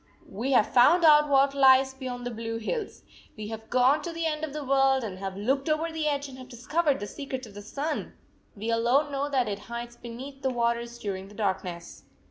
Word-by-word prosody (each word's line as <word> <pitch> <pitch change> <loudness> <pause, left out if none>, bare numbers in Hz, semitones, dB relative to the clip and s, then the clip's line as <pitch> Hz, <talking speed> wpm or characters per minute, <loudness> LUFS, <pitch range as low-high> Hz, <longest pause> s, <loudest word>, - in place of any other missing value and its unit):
We 235 +7 -2
have 230 -4 +3
found 330 +8 +6
out 300 -1 +6
what 275 0 +4
lies 265 -1 +5
beyond 250 -2 -6
the 245 - -3
blue 225 0 -4
hills. 405 - -4 0.3
We 215 0 -6
have 220 0 -8
gone 255 +4 +4
to 345 - -5
the 330 0 -3
end 310 -1 -2
of 315 - -3
the 300 +1 -5
world 270 -1 +3
and 190 -4 -6
have 195 0 -5
looked 270 +8 0
over 315 +2 0
the 320 -1 -2
edge, 285 -1 -1
and 260 -1 -11
have 255 - -11
discovered 285 +5 0
the 205 - -4
secret 260 +3 -6
of 215 - -13
the 205 - -9
sun! 285 +9 -4 0.4
We 220 +3 -3
alone 245 +6 +2
know 280 +1 -2
that 260 -4 +1
it 200 -1 -3
hides 235 0 -6
beneath 255 +4 -9
the 265 - 0
waters 235 -1 -1
during 195 -4 -5
the 205 - -15
dark 200 -3 -1
ness. 170 -2 -9
255 Hz, 225 wpm, -27 LUFS, 225-285 Hz, 0.4 s, found